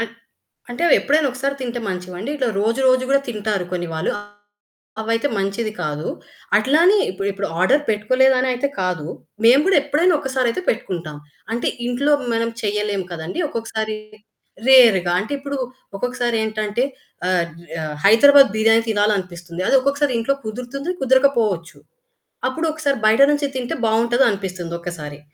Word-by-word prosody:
అన్ 230 -2 -3 0.6
అంటే 245 +7 -5
అవెప్పుడైనా 300 -2 +3
ఒకసారి 275 +2 -2
తింటే 240 -1 -4
మంచివండి. 185 +4 -5
ఇట్లా 260 -3 0
రోజు 225 +5 0
రోజు 255 0 +3
కూడా 275 0 +4
తింటారు 210 -4 -2
కొన్ని 175 -1 -2
వాళ్ళు 160 - -1
అ - - -7 0.8
అవైతే 230 +5 0
మంచిది 200 +3 -2
కాదు. 150 0 -3 0.5
అట్లా 265 +8 +3
అని 390 +4 +5
ఇప్పుడ్ 195 +2 -3
ఇప్పుడు 200 0 -4
ఆర్డర్ 270 +11 +3
పెట్టుకోలేదునయితే 255 +4 +2
కాదు. 180 -5 -2 0.4
మేము 250 +5 +7
కూడా 390 - +4
ఎప్పుడైనా 310 +5 +2
ఒక్కసారి 265 -2 -1
అయితే 300 - -4
పెట్టుకుంటాం. 170 -8 -3 0.4
అంటే 235 - -1 0.2
ఇంట్లో 275 +4 +1 0.2
మనం 230 0 0
చేయలేం 210 -2 -1
కదండీ! 170 - -5
ఒక్కొక్కసారి 220 -2 -4 0.7
రేరుగా 225 -10 +6
అంటే 215 +7 -6
ఇప్పుడు 280 0 -5 0.4
ఒక్కొక్కసారి 245 +1 -2
ఏంటంటే 215 +1 -2 0.5
ఆహ్, 180 -2 +2
జు 170 - -15 0.2
ఆహ్, 150 -1 -5
హైదరాబాద్ 275 +7 +7
బిర్యానీ 225 +1 +4
తినాలనిపిస్తుంది. 185 -5 -1
అది 270 - +5
ఒక్కొక్కసారి 280 +1 0
ఇంట్లో 230 +5 0
కుదురుతుంది, 250 +8 -5
కుదరకపోవచ్చు. 240 -10 +1 0.7
అప్పుడొకసారి 310 -1 -1
బయట 220 +4 +4
నుంచి 290 0 0
తింటే 250 -2 -3
బావుంటదనిపిస్తుంది 220 -6 0
ఒక్కసారి. 155 -4 -7
230 Hz, 135 wpm, -20 LUFS, 195-265 Hz, 0.8 s, మేము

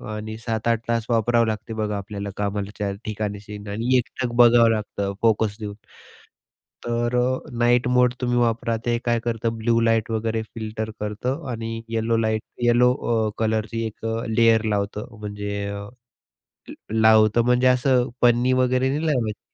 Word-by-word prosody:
आणि 110 +1 -6
7-8 115 0 -1
तास 115 -1 0
वापरावं 115 0 +3
लागतं 110 +1 -4
बघा 105 -1 -2
आपल्याला 100 0 -6
कामाच्या 100 0 -3
ठिकाणी 105 -1 -3
स्क्रीन 105 0 -10
आणि 120 +4 +1
एकटक 120 0 -3
बघावं 120 -1 +6
लागतं 100 -2 -2
फोकस 110 -2 +2
देऊन, 105 -1 -6 1.1
तर 120 +1 -1
अ, 130 +1 +1 0.2
नाईट 120 +1 +3
मोड 125 0 +3
तुम्ही 120 -1 +1
वापरा. 115 -1 +1
ते 120 -1 +1
काय 120 -1 +2
करतं, 115 -1 -2
ब्लू 115 +1 +2
लाईट 115 -1 +1
वगैरे 110 0 -1
फिल्टर 110 -1 -5
करतं 125 +8 -3
आणि 115 0 -4
येलो 115 0 0
लाइट, 110 -1 0 0.2
येलो 120 +1 +4
अ, 110 -2 +1
कलरची 110 0 -1
एक 110 - -10
अ, 115 +1 -2
लेयर 115 0 +4
लावतं, 100 +1 -3
म्हणजे 105 -1 -4
अ, 100 0 -6 1.1
लावतं 110 0 +5
म्हणजे 125 +1 +3
असं 125 0 +3
पन्नी 120 +1 +4
वगैरे 130 +1 +2
नाही 155 +3 -1
लावायची 115 -8 -1
115 Hz, 150 wpm, -23 LUFS, 110-120 Hz, 1.1 s, बघावं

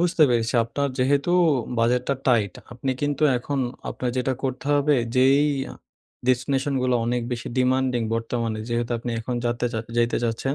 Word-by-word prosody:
বুঝতে 175 -2 +3
পেরেছি। 115 +1 0
আপনার 140 +5 -2
যেহেতু 140 +6 +2 0.5
বাজেটটা 125 +4 +2
টাইট 110 -6 +3 0.2
আপনি 130 +2 -3
কিন্তু 145 +1 -1 0.2
এখন 140 +3 -3 0.3
আপনার 125 -1 -3
যেটা 130 +1 0
করতে 135 +2 -3
হবে। 145 +1 +3 0.2
যেই 135 +3 +5 0.9
ডেস্টিনেশনগুলো 130 0 +1
অনেক 120 0 0
বেশি 120 - -4
ডিমান্ডিং 130 -1 +2
বর্তমানে 115 -1 -2
যেহেতু 120 0 -1
আপনি 120 +1 -5
এখন 125 +2 -4
যাতে 120 +1 0 0.3
যাইতে 120 0 +2
চাচ্ছেন। 120 +4 -1
125 Hz, 140 wpm, -24 LUFS, 120-135 Hz, 0.9 s, যেই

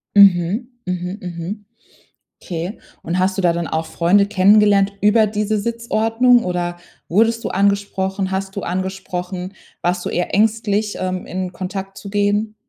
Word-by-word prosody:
Mhm, 200 +3 +5 0.2
mhm, 180 +1 -3
mhm. 180 +4 -6 0.8
Okay. 175 +3 -5 0.3
Und, 170 +3 -1
hast 190 +1 0
du - - +1
da 175 -1 +4
dann 170 -1 -3
auch 160 0 -2
Freunde 180 +5 +3
kennengelernt 200 0 +4
über 215 +2 +4
diese 210 +1 -1
Sitzordnung 230 +2 +2
oder 175 -1 -2 0.3
wurdest 225 +5 +2
du - - -2
angesprochen? 195 -1 0
Hast 195 +1 -3
du 200 - -3
angesprochen? 185 0 -4 0.3
Warst 175 0 -1
du - - -2
eher 175 - -2
ängstlich, 210 0 +1
ähm, 185 0 -3
in 185 0 -4
Kontakt 195 +1 -6
zu 200 - -9
gehen? 205 +1 0
195 Hz, 145 wpm, -19 LUFS, 180-210 Hz, 0.8 s, Mhm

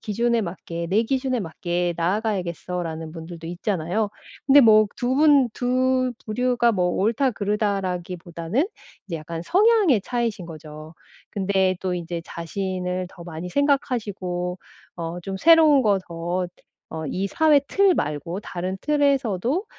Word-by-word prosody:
기준에 235 +2 +1
맞게 170 -2 -5
내 210 +5 +3
기준에 255 0 -1
맞게 175 0 -2
나아가야겠어.'라는 175 -4 -2
분들도 165 0 -8
있잖아요. 180 +3 -1 0.4
근데 285 +1 +8
뭐 215 -3 +6
2 250 +1 0
분 285 -3 +5
2 255 0 +1
부류가 240 +1 +2
뭐 180 -4 +1
옳다 235 +6 +2
그르다라기보다는 190 - -2 0.4
이제 170 - -3
약간 165 +1 -6
성향의 390 - +4
차이이신 230 -3 -2
거죠. 155 0 -10 0.4
근데 190 -1 +1
또 185 -1 -1
이제 170 -1 -4
자신을 180 +1 -3
더 175 - -12
많이 170 +1 -6
생각하시고 205 -10 -1 0.4
어 170 +1 -5
좀 190 +2 -5
새로운 315 - +6
거 205 -4 +3
더 175 +2 -2 0.4
어 160 - -5
이 190 +2 -2
사회 300 +7 +4
틀 395 +1 +3
말고 150 +6 -3
다른 185 0 -4
틀에서도 280 - +1
195 Hz, 280 characters per minute, -23 LUFS, 175-250 Hz, 0.4 s, 근데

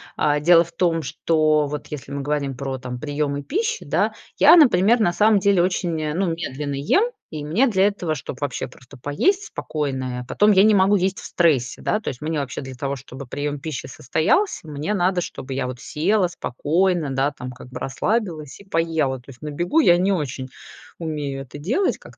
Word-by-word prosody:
А, 150 0 +2
дело 170 +2 +6
в 170 - -15
том, 165 -1 +1
что 155 -1 +1
вот 150 +1 -5
если 145 -2 -8
мы 140 0 -3
говорим 140 -2 -2
про, 135 0 -4
там, 125 -1 -6
приемы 145 0 -2
пищи, 445 - -2
да, - - +1 0.2
я, 340 - +8
например, 235 - +5
на 175 -5 +2
самом 210 +2 +4
деле 195 -2 +3
очень, 175 -3 -1
э, 150 -1 -2
ну, 185 +3 0
медленно 145 -3 -4
ем, 145 - +2 0.3
и 150 -2 -5
мне 200 - +3
для 195 -5 +3
этого, 180 -6 -2
чтоб 135 -1 -7
вообще 140 -2 -2
просто 125 +2 -16
поесть 355 - +1
спокойно, 130 - -3
а, - - -7
потом 210 +10 +3
я 195 -1 +6
не 215 +1 +5
могу 195 +1 +4
есть 190 0 0
в - - -10
стрессе, 145 -8 +1
да. 215 - 0
То - - -15
есть 125 - -4
мне 155 0 -1
вообще 140 -4 -4
для 130 -1 -8
того 140 +2 -3
чтобы 130 0 -10
прием 145 +2 -3
пищи 150 -3 -5
состоялся, 160 - 0
мне 150 +7 -3
надо 180 -1 +1
чтобы 135 -5 -6
я 130 -1 -2
вот 125 -1 -6
села 180 - +1
спокойно, 170 0 0
да 135 +2 +1
там 125 -2 -8
как 125 - -12
бы 125 - -7
расслабилась 160 - -2
и - - -13
поела. 160 -6 0
То 120 - -22
есть 125 -3 -13
на 150 - -4
бегу 175 - +1
я 175 - +6
не 185 +3 +2
очень 140 -7 -2 0.5
умею 150 -4 -4
это 135 +2 -10
делать, 245 - 0
как - - -15
155 Hz, 210 wpm, -22 LUFS, 140-185 Hz, 0.5 s, я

